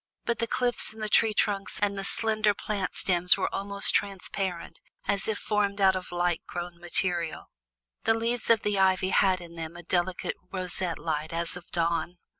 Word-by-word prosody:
But 235 -1 -1
the 230 - 0
cliffs 245 -2 +2
and 220 0 -8
the - - -1
tree 220 0 +4
trunks 200 -2 0
and 200 -1 +1
the 195 - -4
slender 215 0 +1
plant 200 -3 -3
stems 180 -1 +4
were 190 - -1
almost 200 0 0
transparent, 190 -2 -2 0.3
as 200 - 0
if 220 -2 0
formed 205 -1 0
out 190 -1 +5
of 185 -1 -5
light 175 -1 0
grown 175 0 -6
material. 175 -1 0 0.5
The 225 - +4
leaves 230 +1 0
of 230 -2 +4
the 205 -1 0
ivy 190 0 +3
had 190 -1 +3
in 170 -1 -10
them 165 0 -7
a 175 - -10
delicate 180 +1 -1
roseate 180 -2 -3
light 155 -1 -3
as 170 +1 -2
of 175 -1 -11
dawn. 170 0 -1
190 Hz, 185 wpm, -28 LUFS, 175-205 Hz, 0.5 s, out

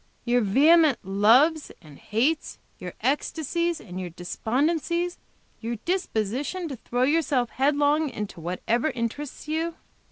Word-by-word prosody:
Your 245 0 +3
vehement 290 - +5
loves 235 - +3
and 150 -4 -15
hates, 265 +9 -1 0.2
your - - -7
ecstasies 325 +4 -1
and 185 -2 -8
your 180 -1 -4
despondencies; 310 - -1 0.4
your 235 +1 -3
disposition 315 - -2
to 270 - -6
throw 245 +2 -1
yourself 280 -4 +1
headlong 290 +2 +2
into 210 -7 -6
whatever 220 - -1
interests 255 +6 -5
you." 325 +2 -2
275 Hz, 120 wpm, -25 LUFS, 220-320 Hz, 0.4 s, vehement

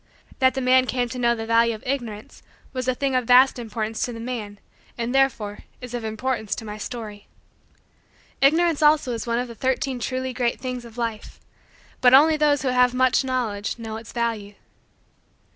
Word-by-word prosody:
That 260 0 +3
the 265 - -1
man 255 0 +4
came 245 -1 -1
to 250 - -6
know 235 -1 +2
the 225 -1 -5
value 230 0 +3
of 215 - -13
Ignorance 240 -6 -5 0.3
was 255 -1 -3
a 255 - +1
thing 275 +1 -1
of 255 -1 +1
vast 250 +2 +5
importance 220 -1 -4
to 245 - -1
the 230 - -8
man 225 -4 -5 0.4
and, 235 +1 -2
therefore, 240 -7 +1 0.2
is 250 -1 -9
of 240 -2 -4
importance 220 0 -2
to 225 - -8
my 210 0 -7
story. 215 -4 -7 1.1
Ignorance 320 +3 +3
also 300 -4 +4
is 230 0 -5
one 235 0 0
of 250 +1 -2
the 235 - -9
Thirteen 260 +2 -1
Truly 255 +2 -3
Great 245 -1 -1
Things 250 -2 -5
of 230 0 -13
Life 230 -2 -4 0.6
but 250 0 +7
only 310 +3 +6
those 295 -2 +2
who 265 - +1
have 250 0 +3
much 255 +1 +3
knowledge 240 -6 -2
know 220 -1 -6
its 225 0 -10
value. 225 -4 -3
245 Hz, 190 wpm, -23 LUFS, 225-260 Hz, 1.1 s, but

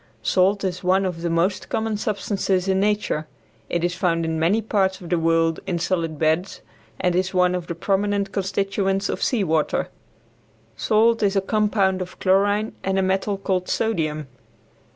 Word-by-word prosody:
Salt 195 +2 +2
is 185 -1 -3
one 190 +2 +3
of 175 -3 -3
the 170 - -1
most 175 +4 0
common 220 -1 -1
substances 200 -2 -1
in 190 0 +2
nature. 205 -7 0 0.4
It 175 -1 -1
is 175 0 +1
found 170 -2 0
in 160 0 -2
many 175 +7 +3
parts 195 -4 0
of 175 - -10
the 175 - +2
world 165 0 +2
in 175 - -1
solid 165 -2 -1
beds, 160 +5 0 0.4
and 180 -1 +1
is 185 +1 0
one 180 0 +3
of 180 -2 -3
the 170 - -4
prominent 200 +2 0
constituents 195 0 -1
of - - -3
sea 235 -6 +1
water. 160 -3 0 0.9
Salt 220 - +2
is 200 -1 +2
a - - +4
compound 200 -2 +1
of 180 - -7
chlorine 205 +3 +2
and 195 0 0
a 190 - +2
metal 190 +2 0
called 185 -2 -2
sodium. 155 -9 -1
190 Hz, 175 wpm, -23 LUFS, 170-200 Hz, 0.9 s, a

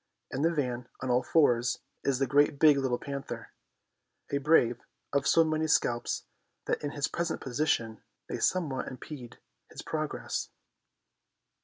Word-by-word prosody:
In 135 - -2
the 165 +2 +3
van, 125 -6 -2
on 130 - -1
all 125 +1 +4
fours, 120 -7 +3 0.3
is 135 -2 +1
Great 145 +2 +3
Big 150 0 +7
Little 130 -3 0
Panther, 140 0 -6 0.8
a 140 - +1
brave 130 -5 +3 0.3
of 140 -1 +2
so 165 - +6
many 155 0 0
scalps 120 -5 +1 0.4
that - - -1
in 145 - -1
his 145 -2 0
present 170 -1 -2
position 120 -5 -1 0.3
they - - -4
somewhat 150 -8 0
impede 130 -2 -8 0.3
his - - -9
progress. - - -3
140 Hz, 140 wpm, -30 LUFS, 125-155 Hz, 0.8 s, Big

